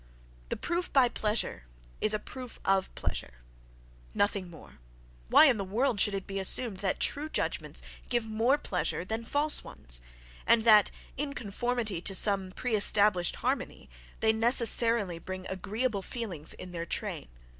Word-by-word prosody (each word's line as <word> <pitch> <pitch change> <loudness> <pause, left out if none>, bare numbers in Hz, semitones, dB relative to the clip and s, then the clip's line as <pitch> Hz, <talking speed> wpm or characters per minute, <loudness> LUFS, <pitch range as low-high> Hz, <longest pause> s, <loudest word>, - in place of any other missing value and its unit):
The - - -3
proof 345 +1 -3
by 260 -3 +4
"pleasure" 210 - -2 0.4
is 215 0 +4
a - - +1
proof 250 +3 -10
of 190 -1 +1
"pleasure"—nothing - - -5
more; 160 - -15 0.5
why - - +7
in 260 -6 +4
the 200 - -3
world 220 +4 -1
should 200 +1 +2
it 195 - -5
be 195 0 -5
assumed 200 +2 +1
that 195 -1 -2
true 300 +2 0
judgments - - -2 0.3
give 240 -2 0
more 225 +5 +1
pleasure 180 - -3
than 220 +4 -4
false 290 +5 +2
ones, - - -1 0.5
and 230 -1 +4
that, 215 -3 +6 0.3
in 280 0 -4
conformity 220 -3 -3
to 195 +1 -2
some 195 -2 +4
pre 245 +4 -4
established 205 -3 +3
harmony, 265 +2 -3 0.3
they 220 0 +3
necessarily 230 -5 +4
bring 185 +2 -7
agreeable 210 +4 -3
feelings 190 - -2
in 180 - -8
their 170 -1 -5
train? - - -4
210 Hz, 150 wpm, -29 LUFS, 185-240 Hz, 0.5 s, why